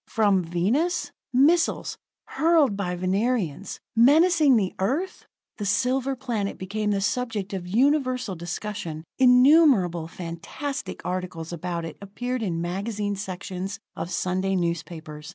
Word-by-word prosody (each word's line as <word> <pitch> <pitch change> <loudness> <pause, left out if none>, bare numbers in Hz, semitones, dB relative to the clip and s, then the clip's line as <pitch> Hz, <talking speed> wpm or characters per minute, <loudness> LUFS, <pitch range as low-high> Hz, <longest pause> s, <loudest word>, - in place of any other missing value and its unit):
From 205 -4 +3
Venus! 210 - 0 0.2
Missiles, 315 +7 +3 0.3
hurled 315 -9 +3
by 180 -3 -2
Venerians, 195 - -1 0.2
menacing 300 +4 +5
the 195 -5 +1
Earth! 290 - -2 0.3
The 205 - -4
silver 260 +6 +1
planet 235 -6 -3
became 210 +3 -2
the 200 -1 +1
subject 210 -3 -2
of 180 -2 -4
universal 255 0 +1
discussion; 175 -2 -5 0.2
innumerable 250 - +5
fantastic 175 - -6
articles 180 -2 -4
about 170 0 -3
it 165 - -8
appeared 245 +5 -4
in 170 -6 -2
magazine 205 +3 -2
sections 190 0 -5 0.2
of 170 - -4
Sunday 185 +2 -1
newspapers. 165 -3 -4
200 Hz, 115 wpm, -25 LUFS, 180-255 Hz, 0.3 s, menacing